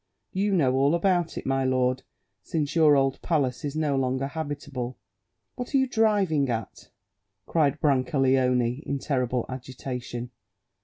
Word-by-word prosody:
You 200 +2 +1
know 145 -9 +3
all 140 +4 +3
about 175 -1 +1
it, - - -5
my 135 0 +1
lord, 130 0 +1 0.4
since 150 -2 -2
your 155 -3 +6
old 135 -1 +1
palace 140 -7 0
is 145 0 -3
no 150 -3 +1
longer 130 0 0
habitable." 145 -4 -5 0.6
"What 250 +3 -4
are - - +7
you 265 - +4
driving 205 - +2
at?" 115 -2 -5 0.6
cried 145 -3 +1
Brancaleone 130 -2 +2
in 140 - -2
terrible 125 -3 -1
agitation. 125 -1 -6
135 Hz, 140 wpm, -26 LUFS, 130-160 Hz, 0.6 s, are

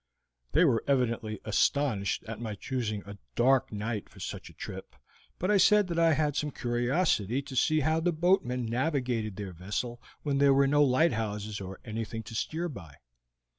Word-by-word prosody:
They - - +5
were 115 - +2
evidently 115 -5 0
astonished 110 -2 +1
at 115 -1 -7
my 110 -3 -4
choosing 110 -2 -3
a 100 0 -10 0.2
dark 130 +2 +3
night 105 0 -4
for - - -16
such - - -6
a - - -15
trip, - - -8 0.4
but 185 +4 0
I 210 - +5
said 210 +1 +5
that 170 -1 -1
I 165 -1 +5
had 150 -1 +1
some 150 0 0
curiosity 120 - 0
to 135 -1 -9
see 155 +5 +3
how 155 +3 +2
the 175 +2 +1
boatmen 155 -8 +1
navigated 120 - -1
their 100 -2 -6
vessel 105 +7 -4 0.2
when 140 -2 0
there 140 -1 +5
were 140 0 +5
no 145 +2 +4
lighthouses 110 -7 +1
or 95 0 -7
anything 110 0 -4
to 110 - -10
steer 160 +9 -2
by. 85 - -10
125 Hz, 175 wpm, -29 LUFS, 110-145 Hz, 0.4 s, They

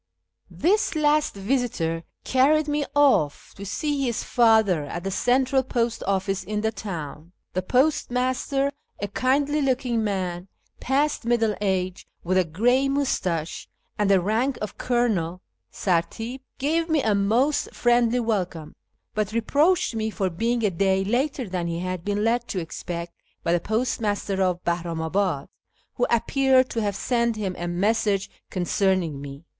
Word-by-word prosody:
This 395 +2 +1
last 300 -3 +2
visitor 195 -7 -1 0.2
carried 295 +4 +3
me 295 -1 0
off 270 - +3
to 200 - -9
see 280 +8 -1
his 240 -4 -1
father 220 -9 +3
at 175 +4 -6
the 195 - -2
Central 260 +5 +2
Post 240 -2 -1
Ofl&ce 195 0 0
in 210 +2 -3
the 220 0 0
town. 170 -5 -7 0.2
The 185 - 0
postmaster, 260 +3 +1 0.3
a 205 - -2
kindly 280 +7 +1
looking 250 -4 0
man, 185 -3 -2 0.3
past 285 +4 0
middle 230 -2 +2
age, 185 -2 -1 0.2
with 185 +2 +2
a - - +4
gray 245 - +2
moustache 185 - -1 0.3
and 210 -1 +1
the 195 -1 +5
rank 225 +8 0
of 210 - -5
colonel 205 -9 0 0.3
{sartip), 225 +8 -1 0.2
gave 325 +4 0
me 315 -3 +2
a 215 - +2
most 225 +9 +1
friendly 240 0 +2
welcome, 180 -8 -2 0.4
but 215 -1 -1
reproached 290 +9 +2
me 220 -1 -1
for 195 -4 -2
being 230 +6 0
a 205 - +2
day 190 +2 +1
later 255 +4 -1
than 180 -2 -2
he 170 0 -2
had 185 -1 -3
been 205 +1 -1
led 240 +2 +1
to 190 - -2
expect 170 0 -5 0.3
by 170 - +1
the 175 - +3
postmaster 210 -2 -1
of 180 -1 0
Bahnimabad, 170 -1 -1 0.5
who 245 - 0
appeared 260 +2 +3
to 230 - -1
have 205 -2 -1
sent 235 +2 0
him 195 -4 -3
a 175 - -4
message 200 +2 0 0.2
concerning 180 -4 0
me. 140 +3 -9
215 Hz, 150 wpm, -24 LUFS, 185-255 Hz, 0.5 s, the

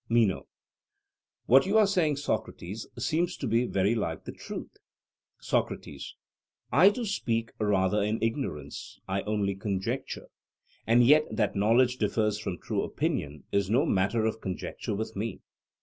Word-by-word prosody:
MENO: 115 -5 +2 1.0
What 135 +9 +6
you 205 +3 +3
are 215 - +7
saying, 180 -7 +2
Socrates, 110 -7 -4
seems 175 +3 0
to - - -4
be 120 +1 +2
very 100 +3 +2
like 85 -8 -3
the - - -5
truth. - - -8 0.6
SOCRATES: - - -2 0.6
I 160 - +7
too 235 +3 -3
speak 115 - -1
rather 105 -1 +2
in 105 +2 0
ignorance; 115 - -4
I 95 +1 -1
only 105 -2 0
conjecture. 105 +6 -3 0.6
And 120 +2 +5
yet 150 +4 +6
that 105 -4 0
knowledge 120 +5 +3
differs 105 -1 +1
from 95 -4 -4
true - - -2
opinion 75 0 -2
is 100 -1 +1
no 130 +8 +3
matter 105 - +1
of 110 0 -1
conjecture 95 +2 -4
with 110 +2 -4
me. 110 +3 -4
110 Hz, 145 wpm, -28 LUFS, 100-130 Hz, 1.0 s, are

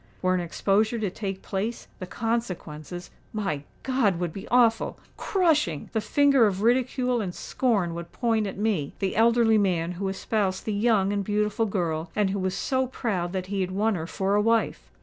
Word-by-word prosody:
Were 185 0 +3
an 185 - +1
exposure 205 +6 +1
to 210 -4 -2
take 195 -1 -5
place, 210 +4 -3
the 185 - -6
consequences—my 180 -4 -4 0.2
God! 255 -9 +2
would 175 -3 -2
be 195 +1 -8
awful—crushing! 245 - +1
The 220 - +1
finger 275 -2 +4
of 195 0 -2
ridicule 250 0 +2
and 180 -4 -4
scorn 205 -10 0
would 170 0 -7
point 225 -3 0
at 195 - -6
me—the 195 -3 -1
elderly 230 -1 +4
man 175 -4 +1
who 190 +2 -3
espoused 190 0 -1
the 215 - -1
young 205 -2 +2
and 200 -1 0
beautiful 210 +2 0
girl, 170 -5 -2
and 205 -2 +2
who 200 - -2
was 185 0 -1
so 260 -1 0
proud 195 -9 -2
that 185 -1 -2
he 195 +1 -2
had 185 - -1
won 210 +4 +1
her 165 -3 -3
for 195 +2 -1
a 205 - +4
wife! 225 +1 +1
205 Hz, 175 wpm, -26 LUFS, 185-230 Hz, 0.2 s, finger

